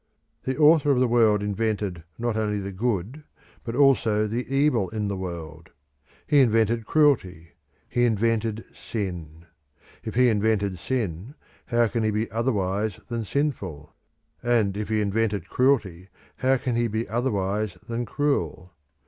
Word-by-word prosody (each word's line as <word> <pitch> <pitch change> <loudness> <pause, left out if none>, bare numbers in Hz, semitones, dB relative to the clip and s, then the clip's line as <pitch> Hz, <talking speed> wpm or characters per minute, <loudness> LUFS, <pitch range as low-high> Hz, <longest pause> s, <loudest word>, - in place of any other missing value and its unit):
The 130 - -2
Author 150 -1 +5
of 135 -3 +3
the 130 - +3
world 110 -3 +3
invented 105 -4 -2
not 120 -1 -1
only 105 -1 0
the 100 0 -4
good 110 - -2 0.4
but 115 -1 -5
also 120 -6 +3
the 115 +4 -3
evil 135 -8 +2
in 105 -2 -3
the 100 - -2
world; 85 -4 -7 0.6
he 145 -2 +4
invented 115 -2 +2
cruelty; 95 - +2 0.4
he 120 0 +1
invented 115 0 0
sin. 85 -6 -6 0.6
If - - -6
he 125 +1 +5
invented 105 -3 0
sin 105 - -3 0.3
how 120 -1 +3
can 115 +1 -2
he 110 - +1
be 110 +2 -2
otherwise 105 -3 -1
than 115 -2 -3
sinful? 100 - -3 0.5
And 115 -5 +1
if 105 +1 -4
he 110 -1 +1
invented 105 0 -1
cruelty 105 -9 +1 0.3
how 130 +1 +2
can 125 -1 -2
he 120 0 +1
be 110 +1 -2
otherwise 105 -4 -1
than 120 +1 -2
cruel? 90 - -1
110 Hz, 145 wpm, -25 LUFS, 100-120 Hz, 0.6 s, Author